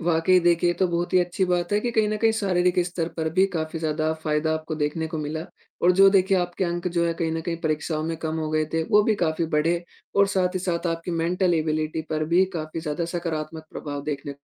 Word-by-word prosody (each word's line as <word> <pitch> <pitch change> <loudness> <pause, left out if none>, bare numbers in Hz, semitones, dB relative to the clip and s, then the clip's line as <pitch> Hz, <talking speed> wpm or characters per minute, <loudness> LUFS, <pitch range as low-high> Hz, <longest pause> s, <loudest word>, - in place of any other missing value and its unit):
वाक़ई 170 +2 +3
देखिए 175 0 +3
तो 190 - +2
बहुत 175 0 -2
ही - - +7
अच्छी 180 +2 0
बात 180 0 0
है 205 - +4
कि 240 - -1
कहीं 220 -2 +2
न 215 - -1
कहीं 225 - +5
शारीरिक 180 -4 +1
स्तर 175 -2 -3
पर 160 -1 -1
भी 190 +3 +4
काफ़ी 160 0 -2
ज़्यादा 155 0 0
फायदा 155 +1 +1
आपको 155 0 -4
देखने 155 +1 -1
को 160 0 -5
मिला 155 +2 -4 0.4
और 180 - +6
जो 195 - +9
देखिए 195 0 +3
आपके 175 +1 -1
अंक 175 +1 -2
जो 170 -1 0
है 170 - +1
कहीं 165 -1 -1
न 165 - -2
कहीं 165 +1 -3
परीक्षाओं 155 0 -1
में 165 0 -2
कम 160 0 -3
हो 155 -1 -2
गए 155 0 +1
थे, 165 0 +1
वो 210 +6 +4
भी 215 +1 +2
काफ़ी 165 -4 0
बढ़े 165 +3 +1 0.3
और 200 0 +6
साथ 185 -2 0
ही - - 0
साथ 175 -1 -2
आपकी 165 +1 -3
मेंटल 175 +2 +1
एबिलिटी 155 0 -1
पर 155 0 0
भी 185 +2 +6
काफ़ी 155 0 -4
ज़्यादा 155 +1 -2
सकारात्मक 160 -2 -4
प्रभाव 145 -1 -5
देखने 145 -1 -4
165 Hz, 235 wpm, -24 LUFS, 155-180 Hz, 0.4 s, जो